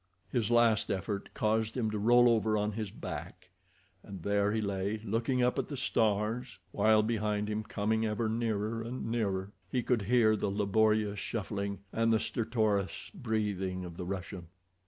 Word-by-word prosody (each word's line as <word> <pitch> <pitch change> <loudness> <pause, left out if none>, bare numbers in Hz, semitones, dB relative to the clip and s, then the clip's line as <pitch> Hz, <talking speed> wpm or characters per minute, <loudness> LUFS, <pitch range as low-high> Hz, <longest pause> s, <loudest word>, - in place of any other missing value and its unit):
His 115 -4 0
last 120 -3 +4
effort 100 +1 -3
caused 110 +2 0
him 110 -3 0
to 105 - -2
roll 120 +3 +6
over 110 -2 +3
on 105 +1 0
his 105 -1 -4
back, 90 -1 -8 0.5
and 95 -4 -9
there 100 0 +2
he 110 - 0
lay 100 0 -1
looking 115 +4 0
up 125 - +2
at - - -2
the 140 - -5
stars, 110 +1 0
while 110 0 +4
behind 105 -2 0
him, 105 0 -1
coming 110 +1 -1
ever 110 +1 0
nearer 110 0 -1
and 120 +3 -5
nearer, 100 -4 -1 0.2
he 125 -2 0
could 120 -2 +1
hear 110 +1 +4
the 105 - -1
laborious 105 +1 +2
shuffling, 100 -2 -3
and 115 0 +2
the 110 - +4
stertorous 110 -4 -1
breathing 105 - -2
of 85 -1 -8
the 90 - -5
Russian. 95 -2 -5
110 Hz, 165 wpm, -31 LUFS, 100-115 Hz, 0.5 s, roll